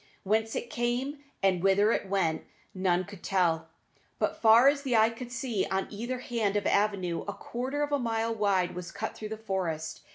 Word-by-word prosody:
Whence 220 +2 +1
it 240 - -4
came 245 +4 -1 0.2
and 185 -3 +3
whither 195 +3 +4
it 200 - -1
went 175 -5 0 0.3
none 185 -1 +1
could 200 -1 -11
tell, 165 -4 +1 0.5
but - - -1
far 230 +3 +7
as 280 0 +4
the 265 -4 0
eye 220 +1 +5
could 240 +1 -8
see 230 -4 -1
on 190 0 0
either 235 +5 -3
hand 230 -5 -1
an 205 - 0
avenue 200 -4 +1
a - - -2
quarter 265 +5 -3
of 290 - -2
a 285 - +2
mile 230 -1 0
wide 200 -4 +1
was 180 -1 -6
cut 220 - -4
through 215 - -7
the 220 - -5
forest. 185 -7 -3
215 Hz, 195 wpm, -29 LUFS, 190-240 Hz, 0.5 s, far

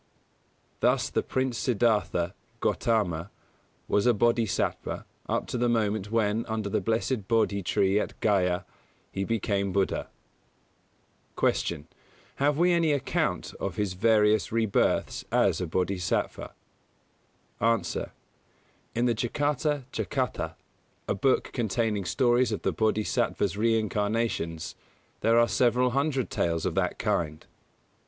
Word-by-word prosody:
Thus - - +2
the - - +1
Prince 130 -3 -1
Siddhartha 105 -7 +1 0.3
Gautama 95 -6 0 0.6
was 105 +4 +2
a 120 - +5
Bōdhisattva 115 -1 0 0.2
up - - 0
to 125 - -3
the 120 0 +2
moment 105 -3 0
when, 110 0 +1
under 110 -2 -2
the - - 0
blessed 115 -1 -1
Bōdhi 110 -3 +1
tree 95 +3 +2
at - - -4
Gayā, 90 -3 +1 0.5
he 95 - -2
became 100 -2 0
Buddha. 95 0 0 1.3
111. 80 -4 0
Q. - - -28 0.5
Have 145 +1 +2
we 175 +2 +4
any 165 -3 +3
account 140 -2 -1
of - - -3
his 105 -4 -1
various 105 +1 +3
rebirths 110 -2 +1
as - - +2
a 90 - -2
Bodhisattva? 90 +1 -1 1.0
A. 115 +1 +3 1.2
In 120 +1 +2
the 120 - +3
Jātakatthakathā, 135 - -1 0.5
a - - +1
book 130 +7 +1
containing 110 -4 0
stories 120 0 +2
of 105 - -3
the 95 - +1
Bōdhisattva's 105 0 0
reincarnations, 105 -6 0 0.5
there 115 +1 +3
are 120 0 +5
several 125 +1 +2
hundred 135 -1 0
tales 85 -1 0
of - - 0
that - - 0
kind. 75 -2 -1
110 Hz, 120 wpm, -27 LUFS, 100-120 Hz, 1.3 s, a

